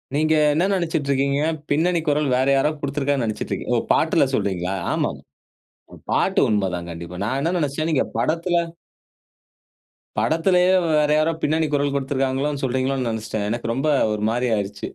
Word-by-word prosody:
நீங்க 155 +1 +2 0.2
என்ன 175 +5 +2
நெனச்சுட்டு 160 -6 -1
இருக்கீங்க. 140 +1 +1 0.3
பின்னணி 170 +4 +2
குரல் 145 -1 +1
வேற 130 +1 +1
யாரோ 135 +2 +3
கொடுத்துருக்காங்கனு 140 -2 -1
நெனச்சுட்ருக்கீங்க. 110 -1 -4
ஓ! - - +3
பாட்டுல - - +3
சொல்றீங்களா? 95 -1 -1 0.2
ஆமாங்க. - - -2 0.7
அ - - -9 0.2
பாட்டு - - +2
உண்ம 105 -3 +1
தாங்க 85 0 -6
கண்டிப்பா. 85 +2 -8
நான் 130 +5 -1
என்ன 170 +5 0
நெனச்சேன், 155 +1 -1
நீங்க 145 - +2
படத்துல 170 +2 0 1.6
படத்துலயே 180 +3 +3 0.2
வேற 150 -1 +3
யாரோ 155 +2 +2
பின்னணி 160 +1 +1
குரல் 145 0 +1
கொடுத்திருக்காங்களோனு 135 +1 -1
சொல்றீங்களோனு 130 0 0
நெனச்சுட்டேன். 110 -2 -3
எனக்கு 115 0 -2
ரொம்ப 135 +5 -1 0.3
ஒரு 105 - -4
மாரி 125 +2 0
ஆயிருச்சு. 100 -1 -4
140 Hz, 150 wpm, -22 LUFS, 120-155 Hz, 1.6 s, யாரோ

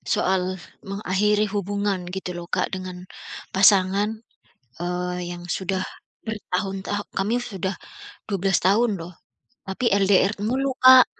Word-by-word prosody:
soal 190 0 +2 0.4
mengakhiri 205 +1 +1
hubungan 200 0 0 0.2
gitu 180 -2 -4
loh 170 - -7
Kak - - 0
dengan 185 -1 -7 0.5
pasangan, 200 +2 +4 0.6
eee, 180 +1 -2 0.2
yang 175 0 -9
sudah 190 0 -1 0.4
bertahun 195 -3 -3
tah 205 0 -1 0.2
kami 205 +4 +1
sudah 190 -5 -3 0.5
12 195 -2 +1
tahun 210 +3 +3
loh, 170 +2 -8 0.6
tapi 190 +6 0
LDR 200 0 +4
mulu 265 +3 +1
Kak, 255 0 +10
195 Hz, 120 wpm, -24 LUFS, 185-210 Hz, 0.6 s, Kak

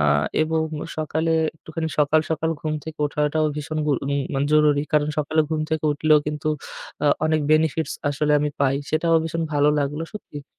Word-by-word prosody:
আ - - +3 0.4
এবং 160 0 0 0.3
সকালে 160 +1 0 0.2
একটুখানি 160 +1 -5
সকাল, 150 +1 +4
সকাল 160 0 0
ঘুম 155 0 -2
থেকে 160 -1 -8
ওঠাটাও 150 +1 0
ভীষণ 155 +1 -4
গু 150 - +3
উম 140 0 0
মানে 135 +1 +1
জরুরি। 150 -1 +4
কারণ 150 -1 +3
সকালে 155 +1 +1
ঘুম 155 -1 0
থেকে 160 -1 -1
উঠলেও 155 +1 +4
কিন্তু 150 0 -2 0.6
আ - - +4 0.2
অনেক 155 0 +2
benefits 155 0 +2 0.2
আসলে 150 +1 0
আমি 150 0 0
পাই 135 -1 +3 0.2
সেটাও 165 +1 +2
ভীষণ 165 +1 -2
ভালো 145 0 +3
লাগলো 145 +2 -1
সত্যিই। 145 -8 -9
155 Hz, 175 wpm, -23 LUFS, 145-160 Hz, 0.6 s, সকাল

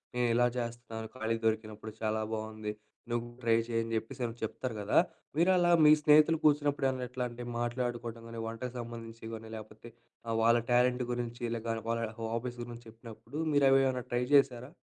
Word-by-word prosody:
నేను 125 -1 +2
ఇలా 120 0 +5
చేస్తున్నాను 115 -2 -5
ఖాళీగా 115 -1 -2
దొరికినప్పుడు. 110 0 -3
చాలా 110 0 0
బాగుంది 110 -1 -4 0.4
నువ్వు 120 0 0 0.2
ట్రై 115 -1 +4
చేయి 115 -1 0
అని 115 0 -5
చెప్పేసి, 115 +3 -6
ఏమైనా 115 0 -5
చెప్తారు 115 +2 -3
కదా! 100 - +1 0.4
మీరు 175 +3 +5
అలా 175 -1 +4
మీ 150 - +9
స్నేహితులు 155 +2 +6
కూర్చున్నప్పుడు 145 -3 +2
ఎట్లా, 125 0 -4
అంటే 120 +1 -7 0.2
మాట్లాడుకోవడం 120 -1 -3
కానీ, 115 -1 -6
వంటకు 120 +2 -5
సంబంధించి 115 -1 -7
కాని 110 0 -8
లేకపోతే 110 +2 -11 0.4
ఆహ్, 115 0 0
వాళ్ళ 115 +1 +6
టాలెంట్ 125 +1 +3
గురించి, 120 0 -4
లేక 115 0 -5 0.2
వాళ్ళ 115 0 0 0.2
హాబీస్ 115 +2 -3
గురించి 120 0 -9
చెప్పినప్పుడు 115 +5 -9
మీరు 140 -1 +5
అవేమన్నా 130 -2 +3
ట్రై 120 0 +1
చేశారా? 130 -1 +3
120 Hz, 165 wpm, -31 LUFS, 115-125 Hz, 0.4 s, మీ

